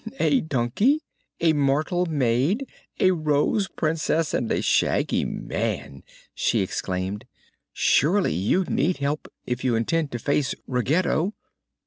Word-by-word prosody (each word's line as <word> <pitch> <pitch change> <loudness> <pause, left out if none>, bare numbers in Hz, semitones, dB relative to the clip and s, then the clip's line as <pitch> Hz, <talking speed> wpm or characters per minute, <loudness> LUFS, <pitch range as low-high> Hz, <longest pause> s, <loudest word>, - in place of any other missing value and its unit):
"A 270 - +3
donkey, 160 - +1 0.4
a 165 -1 +4
mortal 155 +5 +1
maid, 145 - +1 0.3
a 185 - +5
Rose 155 +4 +1
Princess 160 -1 -1
and 115 - -1
a - - +1
Shaggy - - +2
Man!" 70 -1 -4 0.3
she - - +1
exclaimed. 95 +1 -3 0.5
"Surely 180 +7 +2
you 100 - +1
need 170 +2 0
help, 140 +2 -3
if 125 0 -3
you 125 -3 +2
intend 150 +7 0
to - - -1
face 140 +2 0
Ruggedo." 155 - 0
150 Hz, 120 wpm, -24 LUFS, 125-175 Hz, 0.5 s, a